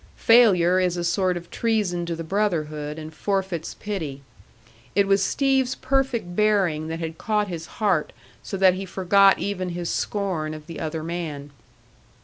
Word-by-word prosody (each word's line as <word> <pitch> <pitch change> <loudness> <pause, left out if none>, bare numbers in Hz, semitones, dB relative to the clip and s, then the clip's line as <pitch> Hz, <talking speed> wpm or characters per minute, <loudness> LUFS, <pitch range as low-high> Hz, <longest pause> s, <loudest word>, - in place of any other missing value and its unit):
Failure 185 -7 +5
is 180 -1 +1
a 175 - -2
sort 180 +1 +1
of 175 0 -10
treason 205 -7 0
to 170 - -2
the 165 - -5
brotherhood, 155 -6 -2
and 155 0 -8
forfeits 190 -2 -2
pity. 155 -10 -5 0.7
It 200 0 +4
was 195 0 +3
Steve's 265 +1 +1
perfect 260 -9 -1
bearing 190 -7 +2
that 165 0 -4
had 165 -1 -6
caught 210 -2 0
his 165 -2 -6
heart 190 -8 +1 0.3
so 195 - -5
that 190 -1 +5
he 190 +1 -5
forgot 195 +2 +4
even 185 -2 -3
his 175 -1 -3
scorn 175 -7 -2
of 155 -1 -11
the 165 0 -8
other 160 0 -4
man. 155 -4 -5
180 Hz, 160 wpm, -24 LUFS, 160-200 Hz, 0.7 s, Failure